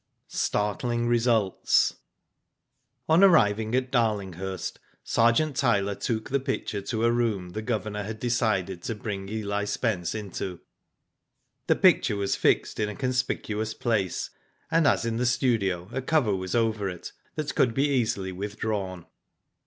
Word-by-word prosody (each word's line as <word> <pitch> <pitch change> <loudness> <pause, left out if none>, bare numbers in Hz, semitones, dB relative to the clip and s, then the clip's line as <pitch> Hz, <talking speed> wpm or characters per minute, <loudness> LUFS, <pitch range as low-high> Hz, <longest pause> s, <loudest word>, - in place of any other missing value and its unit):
STARTLING 120 +3 -1
RESULTS. 115 -4 +2 1.1
On 160 +4 +5
arriving 110 - +4
at 130 0 0
Darlinghurst, 95 -6 -1 0.2
Sergeant 120 +6 +2
Tyler 100 -7 +2
took 110 +3 -3
the 140 - +2
picture 130 -6 -3
to 110 +3 -1
a 115 - +4
room 110 -7 0
the 110 - -4
Governor 110 -2 -2
had 110 +2 -6
decided 105 -7 0
to 115 - -3
bring 100 -2 -5
Eli 105 -1 -2
Spence 105 -5 -1
into. 95 -4 -5 1.1
The - - +4
picture - - +4
was 100 -1 0
fixed - - +1
in 105 -1 0
a 105 - -6
conspicuous 125 -5 -2
place, 105 -6 -1 0.4
and 165 -2 +4
as 120 - +2
in 115 -1 -1
the 125 - 0
studio 100 -8 +1
a 130 - -1
cover 130 -7 +2
was 95 +1 -3
over 110 -4 +1
it 90 -2 -7 0.2
that 155 -2 -3
could 120 -3 +2
be 140 +2 +3
easily 110 -8 0
withdrawn. 100 -2 -4
110 Hz, 140 wpm, -27 LUFS, 100-120 Hz, 1.1 s, On